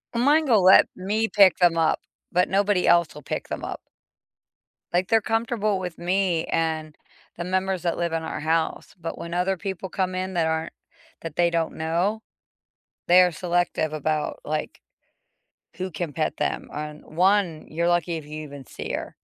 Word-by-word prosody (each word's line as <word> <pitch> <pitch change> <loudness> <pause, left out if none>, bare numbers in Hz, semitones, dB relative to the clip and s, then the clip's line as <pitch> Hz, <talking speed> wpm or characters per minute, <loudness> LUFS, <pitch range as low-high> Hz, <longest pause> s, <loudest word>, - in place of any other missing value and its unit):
Mine 290 +6 +4
will 225 -8 +4
let 185 +1 +8
me 210 +4 0
pick 200 -3 +5
them 175 -2 +4
up, 160 -1 +2 0.3
but 180 +1 +3
nobody 200 -1 +2
else 170 -3 +4
will 150 - -10
pick - - -4
them - - -5
up. - - -5 1.1
Like, 180 +1 +1
they're 225 -1 +4
comfortable 225 -3 0
with 180 -3 -5
me 180 -2 0
and 160 -2 -2 0.4
the 170 - -3
members 185 0 -1
that 170 - 0
live 170 -1 -1
in 165 0 -1
our 160 - -4
house, 160 +1 -1
but 165 0 -5
when 170 0 -6
other 185 +2 0
people 190 0 -5
come 185 0 -1
in 185 +1 -3
that 170 -2 +1
aren't 160 0 -2 0.5
that 165 -2 -7
they 175 0 +3
don't 165 -1 -1
know, 175 +7 0 0.9
they 180 +1 +7
are 180 - +3
selective 175 -2 0
about, 155 0 -2
like, 155 +1 -3 1.0
who 185 +1 -4
can 160 -1 -4
pet 155 +1 -1
them, 150 - -2
and 150 0 -6
1 180 -1 +1
you're 170 +2 0
lucky 175 -1 +1
if 160 - -6
you 155 +1 -6
even 145 -2 -9
see - - -7
her. - - -5
175 Hz, 175 wpm, -24 LUFS, 160-190 Hz, 1.1 s, let